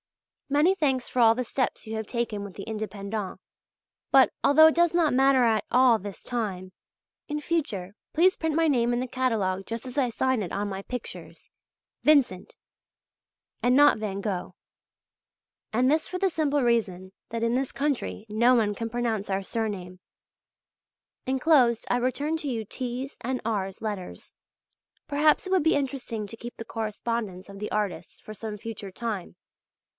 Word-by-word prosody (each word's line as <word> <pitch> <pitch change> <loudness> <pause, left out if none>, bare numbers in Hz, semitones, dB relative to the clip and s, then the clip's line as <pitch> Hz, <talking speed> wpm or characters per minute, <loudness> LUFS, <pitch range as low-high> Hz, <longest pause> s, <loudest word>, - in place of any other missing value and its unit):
Many 295 +6 +4
thanks 270 -8 0
for 255 - -3
all 225 -1 +6
the 250 - -1
steps 255 +1 -2
you 220 - -4
have 220 -1 -4
taken 230 -4 -2
with 200 -3 -9
the 195 - -7
"Indépendents," 210 -2 -4 0.7
but - - +6
although 315 +3 +7
it 320 - +3
does 345 0 +3
not 335 -5 +3
matter 265 0 +4
at 220 -2 +2
all 250 -2 +5
this 200 0 -8
time 190 -6 -4 0.6
in 300 0 -2
future 245 - -2 0.2
please 370 +4 +4
print 320 -2 -1
my 325 0 +3
name 240 -5 +2
in 240 - 0
the 255 - -2
catalogue 215 -7 -1
just 230 +2 -5
as 255 +2 -7
I 255 -3 +2
sign 260 0 0
it 180 - -4
on 205 +1 -2
my 195 -1 -4
pictures, 250 +4 -7 0.5
i.e., - - -10
Vincent, 240 -11 0 1.1
and 245 +1 +3
not 290 -4 +6
van 200 -2 -3
Gogh; 195 -4 -3 1.2
and 250 +4 +2
this 310 +2 +2
for 365 - -3
the 385 0 +1
simple 290 -4 +1
reason 190 -6 0 0.2
that 230 0 -3
in 230 0 +1
this 265 0 -1
country 275 -6 -2
no 235 +4 +4
one 210 -3 +2
can 230 +1 -4
pronounce 225 -4 -2
our 195 0 -1
surname. 190 -4 -4 1.3
Enclosed 260 -3 +3
I 245 - +3
return 280 +6 -1
you 245 -8 -3
T.'s 255 +4 -5
and 255 +1 -2
R.'s 195 -4 -2
letters; 205 -5 -6 0.7
perhaps 300 +4 +3
it - - -5
would 375 -4 +3
be 320 - +4
interesting 260 -6 -3
to 200 - -9
keep 235 +1 -9
the 225 - -7
correspondence 215 -3 -4
of 200 0 -10
the 210 - -4
artists 210 -3 -3
for 215 - -10
some 215 0 -6
future 210 -3 -7
time. 210 -4 -5
235 Hz, 170 wpm, -27 LUFS, 210-270 Hz, 1.3 s, although